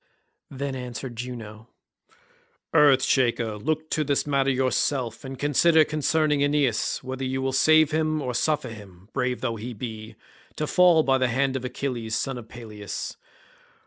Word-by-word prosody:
Then 140 0 -4
answered 125 -1 -6
Juno, 115 -2 -8 1.0
"Earth 145 -4 +5
shaker, 120 -5 +1
look 155 +5 -2
to 155 - +1
this 140 -1 0
matter 140 -2 +1
yourself, 130 -2 0
and 135 -1 -7
consider 155 +3 +4
concerning 155 -1 +1
Aeneas, 145 -6 +1
whether 130 +1 -5
you 130 0 -2
will 130 0 -1
save 155 +3 +5
him, 155 0 0
or 130 -4 -3
suffer 150 +4 0
him, 100 -3 -13
brave 125 0 -1
though 115 -3 -2
he 120 +3 -6
be, 110 -1 -7 0.4
to 155 - -2
fall 175 -1 +5
by 135 -2 +2
the 130 - +2
hand 130 +2 0
of 130 - -3
Achilles 125 -3 -3
son 135 0 -2
of 115 -1 -13
Peleus. 105 -5 -7
130 Hz, 155 wpm, -25 LUFS, 120-145 Hz, 1.0 s, Earth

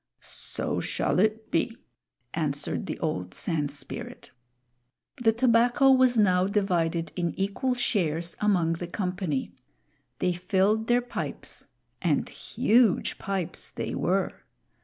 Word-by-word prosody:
"So - - -3
shall - - 0
it 215 +2 +1
be," 225 +8 0 0.6
answered 150 -3 -1
the - - -3
old 90 0 -2
Sand 150 -4 -1
Spirit. 140 -2 -7 0.9
The 230 -2 +4
tobacco 240 +3 +4
was 255 -2 +5
now 185 -3 +4
divided 175 -5 0
in 170 -1 -2
equal 205 +7 0
shares 170 -8 -1
among 180 -6 +2
the 170 +1 -5
company. 180 -6 -2 0.7
They 180 - +1
filled 195 +5 +1
their 245 0 +4
pipes 245 - -5 0.3
and - - +1
huge 230 -3 +2
pipes 190 -3 -3
they - - -4
were! - - +1
190 Hz, 115 wpm, -27 LUFS, 165-225 Hz, 0.9 s, was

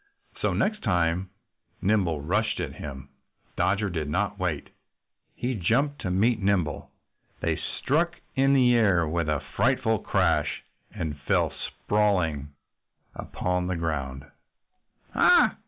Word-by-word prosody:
So - - +2
the - - -1
next 215 0 0
time 90 -2 +1 0.5
Nimble 95 -7 +1
rushed 105 +8 0
at - - -3
him 70 -3 -8 0.5
Dodger 100 +2 +1
did 80 -4 -3
not 100 +5 -1
wait. 85 -6 -2 0.6
He 125 +2 -2
jumped 130 - +1
to 90 - -2
meet 105 +5 +2
Nimble. 95 -7 0 0.5
They - - +1
struck 170 +5 -1 0.2
in 135 +1 +4
the 125 -2 +5
air 100 -8 +3
with 85 0 -1
a 75 -2 +1 0.2
frightful 125 -4 +2
crash - - +1 0.3
and 75 -3 -4
fell - - +2
sprawling 90 -9 0 0.6
upon 90 0 -2
the 90 - -1
ground. 70 -5 -3 0.9
"Ha! - - +5
95 Hz, 125 wpm, -26 LUFS, 80-110 Hz, 0.9 s, the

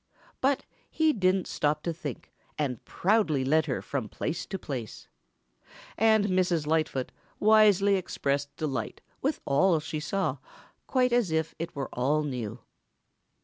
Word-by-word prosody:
But 270 +1 +1 0.2
he 315 -1 +2
didn't 185 -3 +2
stop 150 0 -1
to 170 - -1
think 170 +3 -7 0.2
and 130 -6 -2
proudly 175 -9 +1
led 155 +3 +3
her 130 - -2
from 130 -7 -3
place 165 +2 -3
to 195 - -4
place. 130 - -6 0.9
And 220 -1 +4
Mrs. 180 -5 +1
Lightfoot 155 -4 0 0.3
wisely 205 -2 +5
expressed 140 -5 -2
delight 135 -8 -3 0.2
with 285 +3 -1
all 160 +4 +3
she 155 0 -4
saw 150 -4 -1 0.5
quite 250 -2 +2
as 240 -6 +3
if 160 0 -1
it 165 0 -5
were 135 -2 -3
all 145 +5 +1
new. 125 -5 -4
160 Hz, 140 wpm, -28 LUFS, 140-195 Hz, 0.9 s, wisely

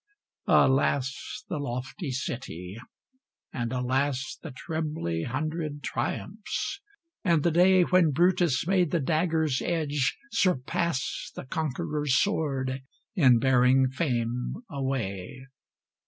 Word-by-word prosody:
Alas, 135 +8 +2
the 150 - -3
lofty 135 +5 -4
city! 115 -8 -5 0.8
and 120 -2 -2
alas, 130 +1 -1
The - - -7
trebly 150 - -3
hundred 150 +2 -3
triumphs! 220 - -3 0.4
and 170 -6 +3
the 170 - +3
day 180 +2 +5
When 180 -2 +4
Brutus 170 -1 +2
made 180 -2 +2
the 170 - +1
dagger's 160 -2 +1
edge 150 -6 0
surpass 170 - 0
The - - -7
conqueror's 150 0 -1
sword 135 -9 -1 0.3
in 130 - +6
bearing 130 +1 +4
fame 125 - -2
away! 130 - -3
140 Hz, 100 wpm, -27 LUFS, 130-165 Hz, 0.8 s, in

